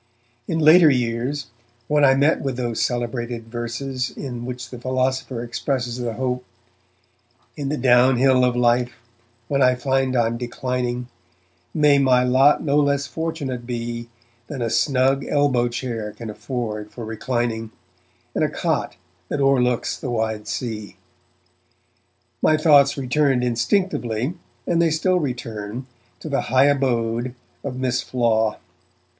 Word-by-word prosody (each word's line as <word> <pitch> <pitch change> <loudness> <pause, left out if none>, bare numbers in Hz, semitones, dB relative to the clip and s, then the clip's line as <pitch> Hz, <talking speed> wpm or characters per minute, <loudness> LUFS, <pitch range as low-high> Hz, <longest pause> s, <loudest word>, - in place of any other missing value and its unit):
In 165 - -1
later 160 +1 +7
years, 125 +2 -1 0.4
when 150 +1 +2
I 135 -1 +6
met 145 +4 +3
with 135 -3 -3
those 120 -3 -2
celebrated 120 -1 -2
verses 125 +2 -3
in 120 -3 -6
which 125 -1 -6
the 125 - -8
philosopher 130 -1 -1
expresses 120 0 -2
the 120 -2 -2
hope 125 +1 -2 1.1
In 140 -2 -3
the 150 - -1
downhill 125 +1 +4
of 125 -1 +2
life, 120 0 +2 0.5
when 140 +1 0
I 125 -1 +5
find 130 +1 0
I'm 115 -1 +1
declining, 125 0 -3 0.6
May 150 -2 +4
my 130 -2 +4
lot 130 +3 +4
no 145 -1 +2
less 140 -1 +2
fortunate 145 -7 -4
be 120 -1 -4 0.4
Than 135 -5 -4
a 115 - -1
snug 135 +2 +2
elbow 135 -5 +2
chair 115 -3 -4
can 115 -2 -7
afford 105 -3 -4
for 115 0 -8
reclining, 115 0 -2 0.6
And - - 0
a - - +2
cot - - -1 0.3
that 145 - -2
o'erlooks 125 -3 +2
the 130 - -4
wide 110 -2 -2
sea 110 -4 -4 1.5
my 155 - +4
thoughts 145 -3 +5
returned 135 -1 +1
instinctively, 120 - 0 0.3
and 170 -1 +2
they 165 - +3
still 180 +4 +1
return, 120 -4 -4 0.4
to - - -7
the 140 -2 0
high 130 +2 +3
abode 120 -3 0 0.3
of 130 -3 -4
Miss 130 -1 0
Flaw. 110 -3 +1
125 Hz, 135 wpm, -22 LUFS, 120-140 Hz, 1.5 s, later